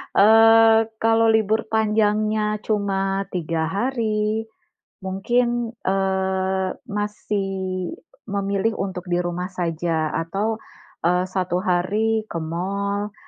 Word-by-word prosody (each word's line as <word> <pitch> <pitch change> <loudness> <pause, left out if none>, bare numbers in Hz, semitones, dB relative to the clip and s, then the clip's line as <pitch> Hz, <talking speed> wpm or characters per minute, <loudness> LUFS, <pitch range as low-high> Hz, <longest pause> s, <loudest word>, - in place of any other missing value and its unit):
Eee, 225 +1 +7 0.2
kalau 225 0 +4
libur 220 0 +2
panjangnya 215 -1 +1
cuma 195 -2 -1
3 165 -2 -2
hari, 215 +1 -1 0.5
mungkin, 235 +5 0
eee, 190 0 0 0.2
masih 205 -2 -3 0.8
memilih 200 +2 0
untuk 190 -1 -4
di 175 0 +1
rumah 175 +1 -3
saja, 165 -3 -1
atau, 200 +7 -2 0.5
eee, 180 +1 +3
1 185 -2 -1
hari 215 +5 +1
ke 170 - -4
mall 200 +5 -3
200 Hz, 95 wpm, -22 LUFS, 185-220 Hz, 0.8 s, Eee